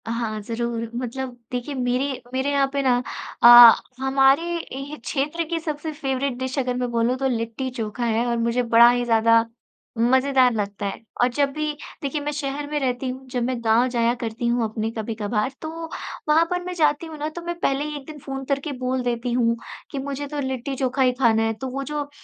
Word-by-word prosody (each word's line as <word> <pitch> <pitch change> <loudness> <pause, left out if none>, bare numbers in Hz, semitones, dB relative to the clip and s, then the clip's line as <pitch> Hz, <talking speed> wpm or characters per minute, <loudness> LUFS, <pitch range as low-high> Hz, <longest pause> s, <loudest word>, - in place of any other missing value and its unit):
हाँ, 225 -2 -2
ज़रूर 230 +1 -3
मतलब 250 +1 -4
देखिए 250 +3 -3
मेरी 255 +2 -1
मेरे 265 +2 0
यहाँ 280 -1 +3
पे 280 - +1
ना 255 -2 +4 0.5
अ, 240 -1 +11 0.3
हमारे 270 +2 +4 0.3
ही 275 +3 -6
क्षेत्र 295 +7 -2
की 335 -1 -1
सबसे 310 -1 -4
फेवरेट 270 -3 -2
डिश 260 +2 -4
अगर 250 -1 -1
मैं 250 0 -1
बोलूँ 235 +2 +1
तो 270 0 0
लिट्टी-चोखा 230 -1 -3
है 230 +1 +1
और 235 0 0
मुझे 235 +2 +1
बड़ा 235 0 +7
ही 245 0 +1
ज़्यादा 230 0 +4 0.6
मज़ेदार 260 +2 +4
लगता 205 -1 -3
है 195 - -4 0.2
और 245 - +5
जब 280 +3 +1
भी 305 0 -1 0.3
देखिए 285 +1 -2
मैं 295 +1 -2
शहर 290 0 -4
में 300 - 0
रहती 255 -1 -1
हूँ, 260 +1 -7
जब 250 -1 -2
मैं 250 0 -1
गाँव 230 +3 +4
जाया 235 -1 +1
करती 235 0 -3
हूँ 240 0 +1
अपने 220 0 -2
कभी-कभार 220 +1 -2
तो 315 - -4 0.6
वहाँ 320 +2 +5
पर 360 0 -1
मैं 360 0 -5
जाती 305 -2 +1
हूँ 315 -1 -9
ना, 300 +1 -3
तो 345 +2 -8
मैं 345 0 -3
पहले 275 -3 0
ही 300 0 -5
एक 275 - -11
दिन 305 -1 -9
फ़ोन 270 -1 -6
करके 280 +2 -2
बोल 255 0 -1
देती 240 0 -2
हूँ 235 -1 +2 0.3
कि 280 - -3
मुझे 280 +1 -4
तो 295 +1 -5
लिट्टी-चोखा 265 0 -2
ही 255 -1 +5
खाना 225 -3 +4
है 225 0 0
तो 225 +5 -6
वो 275 +2 -4
जो 290 0 -4
255 Hz, 205 wpm, -23 LUFS, 235-280 Hz, 0.6 s, अ